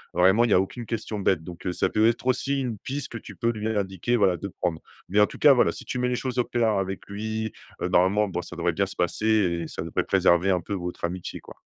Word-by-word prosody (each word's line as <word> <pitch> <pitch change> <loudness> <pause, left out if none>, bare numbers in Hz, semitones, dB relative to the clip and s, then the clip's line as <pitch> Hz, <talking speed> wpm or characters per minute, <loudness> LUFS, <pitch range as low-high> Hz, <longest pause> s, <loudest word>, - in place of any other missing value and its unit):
vraiment, 95 +6 +5
il 120 - -1
y - - +4
a - - +6
aucune 115 +5 -3
question 110 -2 -3
bête. 95 -4 +1
Donc, 85 0 -10
heu, - - +1
ça - - +1
peut 110 +1 +3
être 120 +1 0
aussi 135 +2 +1
une 120 -4 -3
piste 135 +4 -5
que 115 - -6
tu - - -11
peux 115 - 0
lui 110 -1 -4
indiquer, 100 +1 -1
voilà, 100 -6 +3
de 100 - -5
prendre. 85 -3 0 0.3
Mais 100 +3 +2
en 105 - +7
tout - - -10
cas, 145 - +8
voilà, 125 - +3
si - - -10
tu 125 - -4
mets 125 - +1
les 125 - 0
choses 130 0 -3
au - - +4
clair 120 -2 +1
avec 95 0 -2
lui, 110 +2 -3 0.3
heu, - - 0
normalement, 100 +4 +3
bon, 90 -2 -3
ça 90 - -9
devrait 85 +1 0
bien 100 +3 +1
se - - -9
passer 90 +5 -1 0.4
et - - -5
ça - - -6
devrait 85 - -1
préserver 85 +3 +3
un 90 -2 +1
peu 100 - -5
votre 90 -2 -5
amitié, 90 +1 -5
quoi. - - -14
100 Hz, 275 wpm, -25 LUFS, 90-115 Hz, 0.4 s, cas